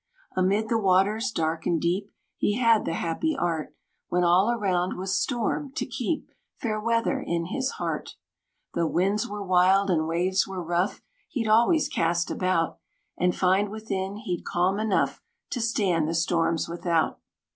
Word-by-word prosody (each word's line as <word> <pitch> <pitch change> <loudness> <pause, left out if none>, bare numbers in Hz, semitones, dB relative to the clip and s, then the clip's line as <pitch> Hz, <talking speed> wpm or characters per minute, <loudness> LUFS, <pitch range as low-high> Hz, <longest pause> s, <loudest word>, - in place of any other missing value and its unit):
Amid 195 +4 +2
the 230 - +2
waters 205 +4 +2
dark 160 -4 -2
and 170 - +2
deep, 185 +5 -1 0.3
He 205 - 0
had 230 -3 +4
the 165 - -1
happy 305 - -1
art, 165 -3 -2 0.3
When 180 0 +1
all 180 +5 +4
around 190 -6 0
was 190 +1 -2
storm, 255 +3 -1
to - - -2
keep 255 +5 -3 0.2
Fair 215 -3 -2
weather 230 +1 +1
in 170 -1 -2
his 265 0 -1
heart. - - -4 0.6
Though 170 -1 +1
winds 195 +6 +1
were 205 0 -5
wild, 185 +2 +4
and 160 -2 +1
waves 180 +3 +1
were 190 -2 -5
rough, 175 +4 -1 0.3
He'd 230 -5 -2
always 235 +9 +4
cast 170 +1 0
about, 185 -3 0 0.4
And 180 0 +1
find 190 +2 +2
within 200 -2 -4
he'd 205 -5 -4
calm 185 +3 +1
enough 215 -2 0 0.3
To 245 - -2
stand 190 -8 +1
the 165 - -1
storms 165 -1 +1
without. 170 -1 0
190 Hz, 155 wpm, -26 LUFS, 175-220 Hz, 0.6 s, had